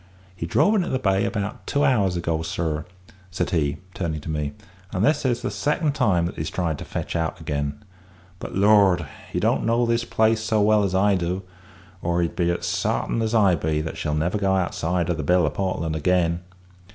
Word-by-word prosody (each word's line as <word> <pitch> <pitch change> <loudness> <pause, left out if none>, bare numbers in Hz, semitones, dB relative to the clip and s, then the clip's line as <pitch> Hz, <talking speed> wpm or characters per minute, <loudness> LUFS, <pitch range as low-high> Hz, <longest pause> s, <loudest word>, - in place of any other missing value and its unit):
He 80 -2 -4
drove 205 - +3
into 190 -5 +1
the 130 - +1
bay 100 -4 +1
about 105 -3 -4
two 145 0 +1
hours 100 -10 +2
ago, 85 -2 -1
sir," 80 -1 -2 0.4
said 90 - -2
he, 75 -4 0 0.2
turning 85 -5 -3
to 80 - -5
me, 75 -2 -2 0.4
"and 95 0 +1
this 150 - +2
is 120 -1 0
the 130 - -1
second 150 +1 0
time 105 - +2
that 85 - -5
he's 75 0 -3
tried 80 -5 -2
to - - -7
fetch - - -4
out 80 -1 -1
again; 70 +6 -3 0.6
but, - - -7
Lord! 100 -4 +5 0.3
he - - -1
don't - - +1
know 115 +1 +2
this 115 0 +1
place 110 -1 +2
so 110 0 +1
well 105 0 +4
as 95 -2 0
I 100 +2 +4
do, 90 +1 -1 0.6
or 85 0 +1
he'd 85 - -3
be 85 -1 +1
as 85 - -1
sartain - - 0
as 110 +1 0
I 100 -5 +5
be 80 -1 0
that 80 - -5
she'll 75 -1 -2
never 85 +7 0
go 95 -1 +2
outside 90 -2 0
o' 90 - +1
the 80 - -3
Bill 90 +3 +3
o' 75 - 0
Portland 85 -5 -2
again. 85 +1 +1
90 Hz, 210 wpm, -24 LUFS, 80-110 Hz, 0.6 s, Lord